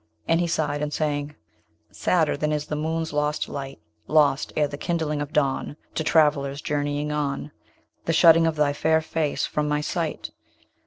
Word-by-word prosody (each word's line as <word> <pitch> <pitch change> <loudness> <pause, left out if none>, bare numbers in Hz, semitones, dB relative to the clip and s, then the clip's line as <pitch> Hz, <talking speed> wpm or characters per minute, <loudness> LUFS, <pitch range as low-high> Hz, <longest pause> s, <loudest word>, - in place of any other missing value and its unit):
And 165 0 +3
he 175 - +1
sighed, 150 -3 -1
and 150 0 -2
sang: 145 -1 -2 0.6
Sadder 165 -4 +1
than 150 +1 -1
is 150 -1 -1
the 150 - -3
moon's 160 +1 -2
lost 150 +1 0
light, 135 - -6 0.3
Lost 150 -2 +3
ere 150 -1 +3
the 145 - -7
kindling 150 -1 -2
of 145 0 -5
dawn, 145 0 0 0.2
To 155 - -1
travellers 145 -3 +2
journeying 145 0 -2
on, 145 0 -2 0.5
The 165 - +1
shutting 165 0 +6
of 160 - 0
thy 150 -1 +2
fair 160 +2 +2
face 155 -2 -1
from 150 0 -1
my 150 0 0
sight. 160 +1 -3
150 Hz, 170 wpm, -24 LUFS, 145-160 Hz, 0.6 s, shutting